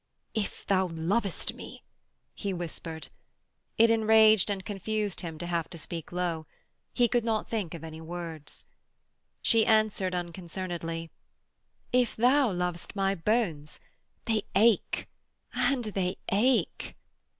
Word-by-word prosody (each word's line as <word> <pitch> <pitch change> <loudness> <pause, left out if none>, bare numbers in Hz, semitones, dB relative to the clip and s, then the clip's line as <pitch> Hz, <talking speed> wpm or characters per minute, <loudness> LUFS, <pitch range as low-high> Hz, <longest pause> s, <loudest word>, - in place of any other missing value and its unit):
'If 215 -3 -3
thou 190 -1 +2
lovest 180 +4 -1
me....' - - -10 0.5
he 200 -2 -3
whispered. 165 -3 -5 0.7
It 230 0 +6
enraged 220 -2 +5
and 195 -2 -2
confused 205 0 -2
him 165 -3 -6
to 175 - -5
have 170 -2 -1
to 170 - -7
speak 165 0 -6
low. 170 -3 -2 0.4
He 245 - +3
could 240 0 +1
not 225 -2 0
think 200 -7 -2
of 165 - -9
any 160 0 -8
words. 165 -2 -7 0.8
She 225 -2 +5
answered 215 -4 +2
unconcernedly: 170 -1 -4 0.8
'If 245 -2 +2
thou 255 +1 +4
lovest 180 0 -3
my 195 -1 +2
bones... 170 -6 -1 0.5
they 220 -2 +1
ache 220 0 +3 0.5
and 270 -3 +2
they 195 -3 -1 0.2
ache.' 235 +6 +1
190 Hz, 125 wpm, -29 LUFS, 170-220 Hz, 0.8 s, It